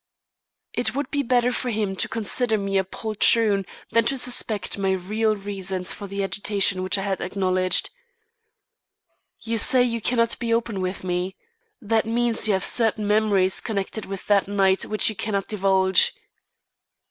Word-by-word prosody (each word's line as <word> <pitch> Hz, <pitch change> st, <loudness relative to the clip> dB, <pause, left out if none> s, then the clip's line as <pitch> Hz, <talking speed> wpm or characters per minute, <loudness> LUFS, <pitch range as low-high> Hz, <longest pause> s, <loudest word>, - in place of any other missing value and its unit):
It 245 Hz, -, -1 dB
would 285 Hz, +1 st, -3 dB
be 285 Hz, -, 0 dB
better 250 Hz, -1 st, +2 dB
for 250 Hz, 0 st, -3 dB
him 210 Hz, -4 st, -2 dB
to -, -, +1 dB
consider 225 Hz, +1 st, 0 dB
me 195 Hz, -1 st, 0 dB
a -, -, +1 dB
poltroon 210 Hz, 0 st, +1 dB, 0.2 s
than 230 Hz, -, +3 dB
to 270 Hz, +3 st, 0 dB
suspect 225 Hz, -6 st, +1 dB
my 195 Hz, -1 st, +1 dB
real 215 Hz, +4 st, -1 dB
reasons 195 Hz, -2 st, -3 dB
for 200 Hz, -, -8 dB
the 200 Hz, 0 st, -3 dB
agitation 195 Hz, -1 st, 0 dB
which 185 Hz, +2 st, 0 dB
I 195 Hz, -, -3 dB
had 195 Hz, -1 st, -2 dB
acknowledged. 185 Hz, -, 0 dB, 1.5 s
"You 230 Hz, 0 st, -2 dB
say 250 Hz, +3 st, +5 dB
you 230 Hz, -2 st, -2 dB
cannot 230 Hz, 0 st, 0 dB
be 230 Hz, -1 st, 0 dB
open 230 Hz, -4 st, -2 dB
with 185 Hz, +1 st, -4 dB
me. 180 Hz, +1 st, -2 dB, 0.4 s
That 220 Hz, -2 st, 0 dB
means 235 Hz, -1 st, 0 dB
you 210 Hz, -, +2 dB
have 190 Hz, 0 st, +1 dB
certain 220 Hz, -2 st, +2 dB
memories 205 Hz, -3 st, +2 dB
connected 215 Hz, 0 st, -4 dB
with 195 Hz, -1 st, -7 dB
that 200 Hz, -2 st, +2 dB
night 195 Hz, -1 st, +2 dB
which 215 Hz, -, +1 dB
you 220 Hz, -, 0 dB
cannot 200 Hz, -1 st, -2 dB
divulge." 190 Hz, -2 st, +3 dB
205 Hz, 160 wpm, -23 LUFS, 190-230 Hz, 1.5 s, say